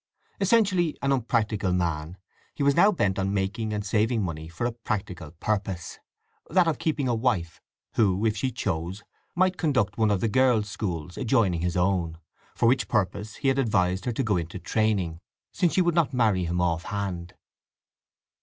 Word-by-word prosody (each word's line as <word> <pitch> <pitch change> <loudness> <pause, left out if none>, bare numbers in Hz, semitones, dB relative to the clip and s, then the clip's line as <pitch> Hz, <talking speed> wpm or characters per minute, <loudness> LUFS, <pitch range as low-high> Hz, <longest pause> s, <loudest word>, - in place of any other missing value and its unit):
Essentially 195 -5 +2
an 140 - +2
unpractical 110 -6 0
man, 85 -1 -2 0.4
he 145 - -2
was 140 0 +4
now 205 +8 +5
bent 100 - 0
on 95 +1 0
making 105 +3 -1
and 105 -1 -3
saving 110 +1 +1
money 80 -3 -4
for 85 +8 -4
a 120 - 0
practical 100 -9 -4
purpose—that 100 - -3
of 160 - 0
keeping 155 -5 0
a 120 - +1
wife, 110 -8 -1 0.3
who, 100 -1 +2
if 110 -1 +2
she 130 +5 -1
chose, 95 -3 -3 0.3
might 185 +1 +2
conduct 125 - 0
one 110 -1 +3
of 100 -2 +2
the 115 - +1
girls' 120 -3 +3
schools 90 -5 -4
adjoining 110 -9 +2
his 90 +1 -1
own; 90 -3 0 0.4
for - - +1
which 130 +2 +3
purpose 105 0 -1
he - - -2
had 135 +1 +1
advised 95 -6 +1
her 125 - 0
to 125 +4 -1
go 105 -5 +1
into 85 +2 -4
training, 95 -5 0 0.3
since 175 -3 +1
she 185 - +3
would 175 -1 +2
not 160 -5 +1
marry 105 -7 +2
him 85 +1 -1
offhand. 90 +1 -2
105 Hz, 175 wpm, -26 LUFS, 90-125 Hz, 0.4 s, now